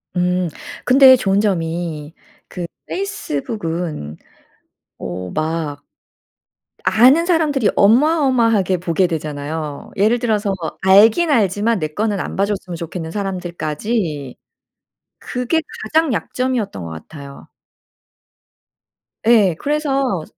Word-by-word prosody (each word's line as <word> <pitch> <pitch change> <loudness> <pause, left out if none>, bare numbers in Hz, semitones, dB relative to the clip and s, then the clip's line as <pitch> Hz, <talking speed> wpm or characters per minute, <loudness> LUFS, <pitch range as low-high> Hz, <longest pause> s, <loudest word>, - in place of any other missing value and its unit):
음 180 0 +1 0.4
근데 260 0 +8
좋은 195 -5 +1
점이 165 -5 -2 0.3
그 175 - -6 0.2
페이스북은 170 - -4 0.8
어 90 +1 -6
막 155 -2 -2 1.0
아는 260 +10 +5
사람들이 305 - +2
어마어마하게 230 - +3
보게 180 +1 +1
되잖아요. 150 -2 -5
예를 220 +5 +3
들어서 210 -4 0 0.3
알긴 215 - +5
알지만 215 -2 +2
내 155 - -2
거는 205 +5 -2
안 - - -5
봐 195 - +2
줬으면 190 -4 -4
좋겠는 165 0 -6
사람들까지 175 - -3 0.9
그게 250 +6 -1 0.2
가장 320 -4 +1
약점이었던 235 - -2
것 - - -6
같아요. 140 - -11 1.8
예 210 -7 +4
그래서 275 - -1
195 Hz, 225 characters per minute, -19 LUFS, 160-240 Hz, 1.8 s, 근데